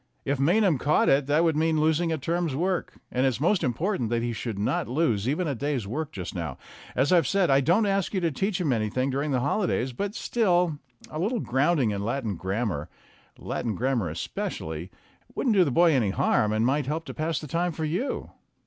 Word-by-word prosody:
If 140 Hz, -1 st, 0 dB
Maynham 175 Hz, -, +3 dB
caught 150 Hz, +4 st, +3 dB
it 135 Hz, 0 st, +3 dB
that 150 Hz, +3 st, +3 dB
would 165 Hz, -2 st, +2 dB
mean 160 Hz, 0 st, +2 dB
losing 160 Hz, +2 st, +2 dB
a 160 Hz, -, 0 dB
term's 165 Hz, 0 st, -1 dB
work 180 Hz, +4 st, -1 dB, 0.2 s
and 125 Hz, -, 0 dB
it's 130 Hz, -3 st, +1 dB
most 175 Hz, +6 st, +2 dB
important 130 Hz, -, -1 dB
that 115 Hz, 0 st, 0 dB
he 120 Hz, 0 st, -1 dB
should 115 Hz, -2 st, -4 dB
not 100 Hz, -, 0 dB
lose 125 Hz, -5 st, +1 dB
even 160 Hz, +5 st, 0 dB
a 145 Hz, -, 0 dB
day's 135 Hz, -2 st, -2 dB
work 145 Hz, +9 st, -4 dB
just 90 Hz, -3 st, -6 dB
now. 85 Hz, -7 st, -4 dB, 0.4 s
As 135 Hz, +6 st, +2 dB
I 175 Hz, -2 st, +6 dB
said, 180 Hz, +2 st, +1 dB
I 135 Hz, +1 st, +5 dB
don't 175 Hz, +10 st, +3 dB
ask 195 Hz, -2 st, 0 dB
you -, -, +2 dB
to 165 Hz, -2 st, +1 dB
teach 195 Hz, +6 st, -1 dB
him 155 Hz, -7 st, +1 dB
anything 120 Hz, +4 st, 0 dB
during 140 Hz, +3 st, -1 dB
the 130 Hz, -3 st, +1 dB
holidays, 140 Hz, -, 0 dB
but 200 Hz, -, -3 dB
still 180 Hz, -9 st, +1 dB, 0.3 s
a 155 Hz, -, -4 dB
little 220 Hz, +7 st, 0 dB
grounding 135 Hz, -, +1 dB
in 100 Hz, -1 st, -3 dB
Latin 115 Hz, -2 st, -2 dB
grammar 95 Hz, -3 st, -2 dB, 0.5 s
Latin 110 Hz, -4 st, -3 dB
gram 130 Hz, +4 st, 0 dB
mar 90 Hz, -6 st, -2 dB
especially 80 Hz, +1 st, -4 dB, 0.5 s
wouldn't 235 Hz, -5 st, +1 dB
do 190 Hz, -, +6 dB
the 155 Hz, -, 0 dB
boy 170 Hz, +6 st, +4 dB
any 125 Hz, -8 st, +2 dB
harm, 105 Hz, +2 st, +2 dB
and 110 Hz, +1 st, +1 dB
might 135 Hz, +1 st, +1 dB
help 160 Hz, +3 st, -2 dB
to -, -, -7 dB
pass 160 Hz, 0 st, -1 dB
the -, -, -5 dB
time 170 Hz, +5 st, -1 dB
for 160 Hz, 0 st, -3 dB
you." 180 Hz, -, -2 dB
145 Hz, 215 wpm, -26 LUFS, 120-170 Hz, 0.5 s, I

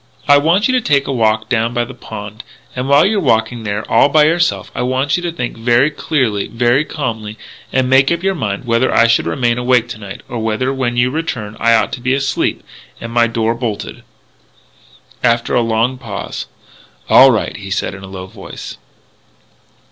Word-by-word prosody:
"I 145 Hz, 0 st, +6 dB
want 170 Hz, +8 st, +2 dB
you -, -, +1 dB
to 255 Hz, -, +2 dB
take 140 Hz, -8 st, +2 dB
a -, -, -3 dB
walk 110 Hz, -2 st, +1 dB
down 115 Hz, -1 st, 0 dB
by 120 Hz, 0 st, +1 dB
the -, -, -10 dB
pond. 105 Hz, 0 st, -9 dB, 0.3 s
And 130 Hz, +1 st, -3 dB
while 140 Hz, +1 st, +5 dB
you're 210 Hz, 0 st, +1 dB
walking 115 Hz, -, +1 dB
there 105 Hz, 0 st, -3 dB
all 115 Hz, +5 st, +4 dB
by 150 Hz, +1 st, +4 dB
yourself, 165 Hz, +1 st, 0 dB
I -, -, -3 dB
want 130 Hz, +3 st, 0 dB
you 175 Hz, -, -2 dB
to 175 Hz, -1 st, -3 dB
think 120 Hz, -8 st, -5 dB
very 120 Hz, +5 st, +2 dB
clearly, 130 Hz, -10 st, -1 dB
very 120 Hz, +4 st, +1 dB
calmly, 110 Hz, -8 st, -5 dB, 0.3 s
and 130 Hz, -1 st, +1 dB
make 135 Hz, +2 st, +4 dB
up 170 Hz, +1 st, -1 dB
your 195 Hz, 0 st, +1 dB
mind 110 Hz, -, -3 dB
whether 115 Hz, +2 st, +1 dB
I 115 Hz, -, +4 dB
should 115 Hz, 0 st, +2 dB
remain 120 Hz, -2 st, 0 dB
awake 125 Hz, -1 st, +2 dB
to -, -, -7 dB
night, 100 Hz, -2 st, -9 dB
or 120 Hz, -, -5 dB
whether, 115 Hz, +4 st, -1 dB
when 125 Hz, -3 st, -2 dB
you 125 Hz, +1 st, +2 dB
return, 130 Hz, -9 st, -4 dB
I 115 Hz, 0 st, +4 dB
ought 110 Hz, -, 0 dB
to 125 Hz, -, -5 dB
be 130 Hz, +2 st, +1 dB
asleep 140 Hz, 0 st, -1 dB, 0.3 s
and 115 Hz, -, -7 dB
and -, -, -9 dB
my 120 Hz, -1 st, +4 dB
door 115 Hz, 0 st, 0 dB
bolted." 115 Hz, -3 st, -5 dB, 1.2 s
After 115 Hz, -1 st, +1 dB
a -, -, +3 dB
long 115 Hz, +3 st, 0 dB
pause: 115 Hz, -6 st, -6 dB, 0.6 s
"All 135 Hz, -, +8 dB
right," 115 Hz, -4 st, 0 dB
he 100 Hz, -2 st, -8 dB
said 100 Hz, -, -2 dB
in 95 Hz, -, -10 dB
a 95 Hz, -, -9 dB
low 95 Hz, -1 st, -8 dB
voice. 95 Hz, -, -10 dB
120 Hz, 200 wpm, -16 LUFS, 110-135 Hz, 1.2 s, All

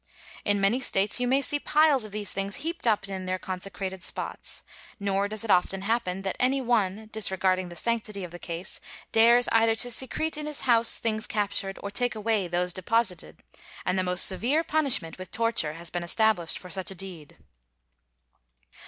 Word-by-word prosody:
In 205 Hz, 0 st, +1 dB
many 200 Hz, +6 st, +2 dB
States 200 Hz, -3 st, +1 dB
you 250 Hz, -, 0 dB
may 270 Hz, +2 st, +2 dB
see 290 Hz, +2 st, +2 dB
piles 300 Hz, -5 st, +3 dB
of 215 Hz, -, -10 dB
these 210 Hz, -1 st, -2 dB
things 195 Hz, 0 st, -3 dB
heaped 335 Hz, -6 st, -3 dB
up 210 Hz, -3 st, +2 dB
in 190 Hz, -1 st, -5 dB
their 185 Hz, 0 st, -1 dB
consecrated 190 Hz, 0 st, -5 dB
spots; -, -, -3 dB, 0.4 s
nor 200 Hz, 0 st, 0 dB
does 215 Hz, +1 st, -2 dB
it 220 Hz, -, 0 dB
often 190 Hz, +2 st, +2 dB
happen 195 Hz, -4 st, -1 dB
that 190 Hz, -, -2 dB
any 260 Hz, +2 st, +2 dB
one, 220 Hz, -4 st, 0 dB
disregarding 185 Hz, -3 st, 0 dB
the 175 Hz, -, -10 dB
sanctity 215 Hz, 0 st, -2 dB
of 175 Hz, -, -7 dB
the 175 Hz, -, -9 dB
case, 170 Hz, +1 st, -5 dB, 0.3 s
dares 235 Hz, +2 st, +5 dB
either 225 Hz, 0 st, +4 dB
to 245 Hz, +2 st, +2 dB
secrete 300 Hz, +6 st, +1 dB
in 300 Hz, 0 st, -4 dB
his 300 Hz, -1 st, -2 dB
house 230 Hz, -2 st, +4 dB
things 220 Hz, -1 st, -1 dB
captured, 200 Hz, -2 st, -2 dB
or 200 Hz, -, -4 dB
take 245 Hz, +3 st, -1 dB
away 215 Hz, -3 st, 0 dB
those 175 Hz, +1 st, -1 dB
deposited; 185 Hz, -1 st, -1 dB, 0.4 s
and 190 Hz, -, 0 dB
the -, -, +1 dB
most 180 Hz, 0 st, +3 dB
severe 250 Hz, -, +3 dB
punishment, 275 Hz, -, +3 dB
with 185 Hz, -, -8 dB
torture, 230 Hz, -10 st, +1 dB
has 170 Hz, +1 st, -8 dB
been 175 Hz, -, -3 dB
established 175 Hz, -1 st, +1 dB
for 180 Hz, -, -11 dB
such 190 Hz, -2 st, -2 dB
a 195 Hz, -, -6 dB
deed. 175 Hz, -6 st, -9 dB
205 Hz, 185 wpm, -27 LUFS, 185-235 Hz, 0.4 s, dares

